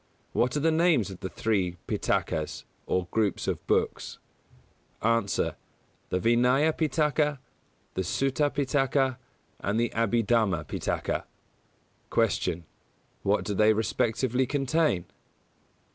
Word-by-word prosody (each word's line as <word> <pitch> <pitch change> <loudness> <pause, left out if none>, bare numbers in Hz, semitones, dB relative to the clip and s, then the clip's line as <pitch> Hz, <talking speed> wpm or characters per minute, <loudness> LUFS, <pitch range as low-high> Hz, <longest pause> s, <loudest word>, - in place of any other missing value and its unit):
What 125 +4 +1
are - - +1
the 160 +3 +3
names 160 - +3
of 95 - -9
the 95 - -4
three 95 -6 -1
Pitakas, 80 -1 -1 0.2
or 90 -1 0
groups 110 -4 0
of - - -2
books? - - 0 0.9
A. 115 0 +3 0.9
The 90 - 0
Vinaya 125 +8 +3
Pitaka, 150 -1 +1 0.6
the - - -1
Sutta 135 - +1
Pitaka 135 -2 +1 0.4
and 105 +3 -1
the 120 0 +1
Abhidhamma 115 -6 +1
Pitaka. - - -2 0.8
163. - - -12 0.4
Q. 85 +1 -11 0.6
_What - - +2
do 105 - -2
they 110 +2 +5
respectively 115 +4 0
contain? 140 - +1
120 Hz, 115 wpm, -28 LUFS, 100-140 Hz, 0.9 s, they